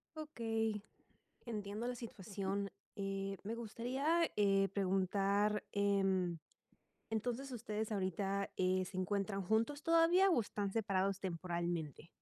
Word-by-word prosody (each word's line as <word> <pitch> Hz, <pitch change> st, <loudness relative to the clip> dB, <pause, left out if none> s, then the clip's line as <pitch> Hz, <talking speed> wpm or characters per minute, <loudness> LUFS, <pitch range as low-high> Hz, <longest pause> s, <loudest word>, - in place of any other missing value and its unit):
Okey, 225 Hz, -8 st, -1 dB, 0.6 s
entiendo 210 Hz, 0 st, -3 dB
la 250 Hz, -, -2 dB
situación. 200 Hz, -3 st, -3 dB, 0.3 s
Eh, 195 Hz, -1 st, -2 dB
me 220 Hz, +3 st, -3 dB
gustaría 260 Hz, +9 st, 0 dB, 0.4 s
preguntar, 200 Hz, +2 st, +2 dB
em, 195 Hz, -4 st, +2 dB, 0.7 s
entonces, 245 Hz, +5 st, -2 dB
¿ustedes 220 Hz, -3 st, -3 dB
ahorita 195 Hz, 0 st, -1 dB
eh, 185 Hz, 0 st, +2 dB
se 185 Hz, -, -8 dB
encuentran 195 Hz, +1 st, 0 dB
juntos 225 Hz, +10 st, +1 dB
todavía 335 Hz, +4 st, +5 dB
o 330 Hz, -, +4 dB
están 205 Hz, -2 st, -2 dB
separados 195 Hz, -3 st, +1 dB
temporalmente? 170 Hz, -4 st, -3 dB
200 Hz, 105 wpm, -37 LUFS, 195-230 Hz, 0.7 s, todavía